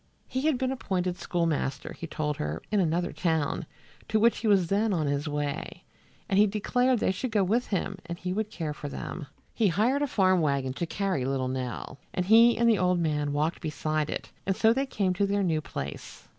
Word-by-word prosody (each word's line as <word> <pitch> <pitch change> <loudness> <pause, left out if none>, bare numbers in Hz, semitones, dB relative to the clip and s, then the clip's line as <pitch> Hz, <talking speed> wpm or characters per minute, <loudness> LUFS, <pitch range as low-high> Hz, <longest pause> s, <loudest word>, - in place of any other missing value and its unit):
He 260 +4 -1
had 305 -5 +2
been 260 0 -1
appointed 185 -8 -2
schoolmaster, 165 -6 -1
he 165 - -7
told 150 -2 -2
her, 75 +2 -3
in 210 - +3
another 175 0 +1
town, 160 -1 -1 0.4
to 220 - +2
which 230 +2 +4
he 225 - -2
was 195 -4 +4
then 205 +4 +1
on 160 -4 0
his 145 +1 -1
way, 145 +1 -3 0.4
and 195 -3 +2
he 210 - +6
declared 245 +5 +1
they 200 - +1
should 250 +7 -3
go 210 -3 +2
with 225 +7 +1
him 195 0 -2
and 170 0 -4
he 180 +1 -3
would 215 +1 -2
care 165 -8 -4
for 145 -1 -6
them. 145 +2 -6 0.3
He 225 - +2
hired 225 - +2
a 290 - +1
farm 185 -7 +3
wagon 140 -3 0
to 170 +5 -3
carry 190 -7 -1
little 130 -1 -1
Nell, 130 0 -4 0.2
and 180 - 0
he 230 +4 +6
and 235 +1 +3
the 220 -4 +4
old 180 0 +2
man 150 -3 0
walked 150 +3 -1
beside 155 -1 -1
it, - - -5 0.2
and 195 - +2
so 225 +3 +4
they 270 +2 -1
came 195 -7 0
to 200 +2 +1
their 200 0 +1
new 160 -4 +1
place. 70 - -7
180 Hz, 215 wpm, -28 LUFS, 150-215 Hz, 0.4 s, he